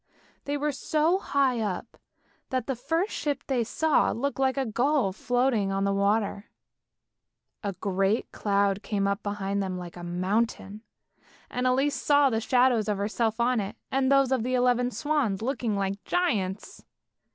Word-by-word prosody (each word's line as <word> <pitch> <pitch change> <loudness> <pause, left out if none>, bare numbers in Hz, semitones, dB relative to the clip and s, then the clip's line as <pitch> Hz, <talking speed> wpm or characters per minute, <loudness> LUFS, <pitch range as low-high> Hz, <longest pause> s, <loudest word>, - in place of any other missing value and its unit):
They 285 +1 -1
were 295 +1 0
so 310 +6 +1
high 275 -8 +1
up 205 -5 -3 0.5
that 255 -3 -1
the 265 - -2
first 325 - -1
ship 285 -2 -2
they 255 -4 0
saw 310 +7 +2
looked 275 +3 -2
like 265 0 +1
a 270 - +1
gull 245 -2 +1
floating 245 -2 +1
on 195 0 0
the 200 0 +1
water. 200 +1 0 1.2
A 200 -1 -2
great 195 +3 0
cloud 200 -1 +1
came 200 -2 -1
up 200 +1 -1
behind 200 -1 -2
them 185 -2 -3
like 175 -1 -8
a 175 - -9
mountain, 195 +4 -1 0.7
and 250 +1 0
Elise 270 +3 +2
saw 285 -2 +4
the 225 0 0
shadow 250 +1 +3
of 210 -1 -1
herself 220 +2 -1
on 240 0 +2
it, 200 -1 -4 0.2
and 265 0 +2
those 275 -1 +4
of 260 -3 +2
the 255 +3 -1
eleven 245 0 +2
swans 235 -4 -1
looking 240 -4 -1
like 195 0 -2
giants. 215 - -1
230 Hz, 165 wpm, -27 LUFS, 200-270 Hz, 1.2 s, saw